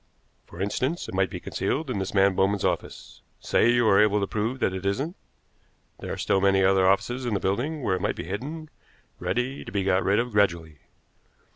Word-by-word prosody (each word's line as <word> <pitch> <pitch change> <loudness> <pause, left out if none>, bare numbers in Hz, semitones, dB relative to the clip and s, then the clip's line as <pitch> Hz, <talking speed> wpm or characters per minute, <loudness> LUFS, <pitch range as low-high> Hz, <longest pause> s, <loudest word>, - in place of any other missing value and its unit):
For 85 - -12
instance, 130 - -2
it - - -8
might 95 0 +1
be - - -6
concealed 155 +2 -2
in 105 - -2
this 95 - -3
man 95 0 +4
Bowman's 95 +1 +1
office. - - -4 0.2
Say 115 - +2
you 120 -1 +3
are 100 -1 +5
able 105 -1 +3
to 100 - 0
prove 110 +5 -2
that 95 - 0
it 95 0 -5
isn't, 135 - -2 0.8
there - - -6
are - - -4
still 95 - +1
many 95 0 +3
other 95 0 +4
offices 120 +7 +1
in 120 -4 -1
the - - 0
building 130 +11 -2
where 95 - +1
it - - -7
might - - -1
be - - -5
hidden, 150 - -6 0.5
ready 125 +3 -2
to - - -9
be 100 -1 -1
got 95 0 +2
rid 100 +2 +2
of 120 +2 0
gradually. 85 -7 0
100 Hz, 215 wpm, -25 LUFS, 95-125 Hz, 0.8 s, are